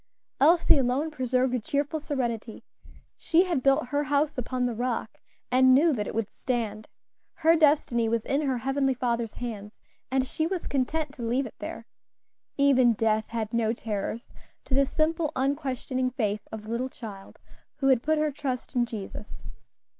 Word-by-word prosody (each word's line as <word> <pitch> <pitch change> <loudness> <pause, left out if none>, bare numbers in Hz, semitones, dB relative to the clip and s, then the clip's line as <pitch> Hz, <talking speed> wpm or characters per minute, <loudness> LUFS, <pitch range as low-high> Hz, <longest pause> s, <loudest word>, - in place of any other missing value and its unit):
Elsie 320 0 +5
alone 270 +5 0
preserved 255 -2 0
a 250 - +1
cheerful 290 +5 -1
serenity. 240 -7 -3 0.5
She 340 +2 +3
had 345 -8 -1
built 275 0 +2
her 290 +1 0
house 290 +1 +1
upon 250 -1 -2
the 245 - -1
rock, 235 -1 -3 0.3
and 255 0 +6
knew 310 +3 +4
that 210 -5 -2
it - - -5
would 225 -2 -2
stand. 220 -4 -3 0.5
Her 330 +1 +4
destiny 290 -7 +3
was 230 -1 0
in 280 +2 +1
her 270 -4 0
Heavenly 270 +2 0
Father's 235 -3 -1
hands, 215 -4 -6 0.3
and 260 0 +1
she 315 +4 -1
was 365 -1 -3
content 285 +2 -1
to 255 - -10
leave 245 +4 0
it - - -8
there. - - -6 0.7
Even 260 -4 +5
death 220 0 +1
had 225 -1 -3
no 225 -1 +1
terrors 220 0 -4 0.3
to - - -6
the 275 +1 +4
simple, 315 +1 0
unquestioning 265 -2 -1
faith 215 -5 -2
of 220 -1 -6
the 215 - -10
little 245 +3 -2
child 205 -6 -10 0.4
who 270 -2 +1
had 255 -3 +4
put 315 +3 +1
her 305 0 +1
trust 265 -3 -4
in 240 -1 +2
Jesus. 210 -1 -8
255 Hz, 170 wpm, -27 LUFS, 230-285 Hz, 0.7 s, and